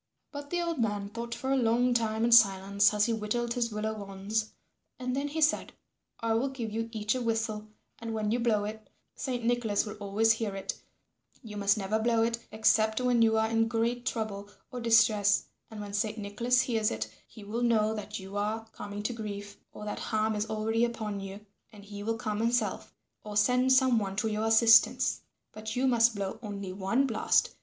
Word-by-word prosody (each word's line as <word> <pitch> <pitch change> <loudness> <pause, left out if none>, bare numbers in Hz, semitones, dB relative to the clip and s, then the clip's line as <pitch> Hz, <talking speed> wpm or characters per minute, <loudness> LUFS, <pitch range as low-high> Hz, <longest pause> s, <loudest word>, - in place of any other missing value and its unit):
But 285 -1 -8
the 350 +1 -1
old 335 -4 -2
man 205 -3 -1
thought 235 +2 -5
for 260 +3 -3
a - - +3
long 245 0 +2
time 225 -1 0
in 235 - +1
silence 200 -3 +5
as 210 -1 +2
he 235 - 0
whittled 235 +2 -2
his 235 -2 -1
willow 215 0 -3
wands, 200 +3 -3 0.5
and 255 0 -3
then 280 +1 -1
he 315 +2 -3
said, 310 0 +2 0.5
"I 230 0 +1
will 240 +5 +1
give 240 -5 -5
you 225 +1 -3
each 215 -1 -1
a 255 - -2
whistle, 225 -2 -2 0.3
and 230 0 -5
when 215 -1 -1
you 240 - +1
blow 225 -3 +1
it, 215 +1 -8 0.3
Saint 245 -3 -3
Nicholas 230 -4 +1
will 210 0 -7
always 205 +2 +2
hear 220 -3 -1
it; 195 - -3 0.7
you 215 -3 -9
must 200 0 +2
never 210 +2 -1
blow 230 0 +2
it 230 0 -1
except 220 0 +2
when 250 -2 +2
you 220 -1 +4
are 220 0 +2
in 225 0 +1
great 235 +1 -1
trouble 205 -3 -3 0.2
or 250 - -5
distress, 225 -3 +4 0.2
and 220 - -9
when 205 -1 -7
Saint 215 +1 -1
Nicholas 235 +5 +1
hears 225 -3 0
it 110 0 -4
he 215 - -13
will 220 +4 -4
know 220 -2 +2
that 210 0 -5
you 195 +1 -9
are 215 +2 -2
coming 205 -1 -7
to 245 - -1
grief 205 -2 -7
or 210 - -9
that 210 - -4
harm 220 0 0
is 210 +1 -2
already 220 +1 0
upon 220 -4 -2
you 195 +2 -8 0.3
and 205 -2 -14
he 205 0 -8
will 225 +2 -2
come 215 -3 -3
himself 230 -3 0 0.3
or 210 -1 -5
send 250 +4 +3
some 260 -3 +5
one 195 -2 -4
to 215 +3 0
your 215 0 -1
assistance. 225 0 +5 0.3
But 215 0 -6
you 255 +2 +1
must 235 -3 +4
blow 200 +2 -4
only 200 -4 -6
one 195 +8 +1
blast. 225 -5 +1
220 Hz, 205 wpm, -29 LUFS, 210-235 Hz, 0.7 s, silence